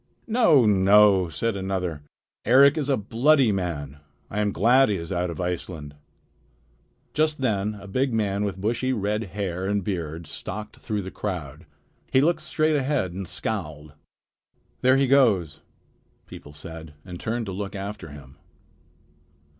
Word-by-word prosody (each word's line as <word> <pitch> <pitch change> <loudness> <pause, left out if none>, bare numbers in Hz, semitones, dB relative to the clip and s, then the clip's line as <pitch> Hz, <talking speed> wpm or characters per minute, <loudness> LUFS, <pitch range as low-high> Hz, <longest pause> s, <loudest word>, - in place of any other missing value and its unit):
"No, 220 - +4
no!" 100 -2 +5
said 110 +7 -2
another. 95 -5 -3 0.4
"Eric 135 +5 +6
is 145 -3 -2
a 135 - +3
bloody 120 +4 +3
man. 75 -7 -4 0.3
I 105 - -2
am 105 -1 +1
glad 120 +8 +4
he 105 - +1
is 85 0 -6
out 90 -1 -1
of 85 - -7
Iceland." 90 -4 -4 1.2
Just 155 -1 +1
then 105 -5 0
a 100 -1 -11
big 130 +7 0
man 105 -3 0
with 100 -2 -3
bushy 120 +6 0
red 105 0 -1
hair 95 -1 -4
and 100 -1 0
beard 85 -4 -4
stalked 105 +7 -7
through 105 -2 -3
the 95 - -7
crowd. 85 -10 -6 0.4
He 130 - +5
looked 165 +5 +2
straight 155 0 +1
ahead 135 - 0
and 95 0 -6
scowled. 75 -10 -5 0.9
"There 130 +1 +5
he 135 - +3
goes," 110 - +3 0.6
people 75 - -12
said, 80 +1 -10
and 90 -2 -8
turned 115 +1 -2
to 100 - -5
look 100 +1 -5
after 100 -2 -6
him. 70 -1 -13
100 Hz, 150 wpm, -25 LUFS, 90-120 Hz, 1.2 s, Eric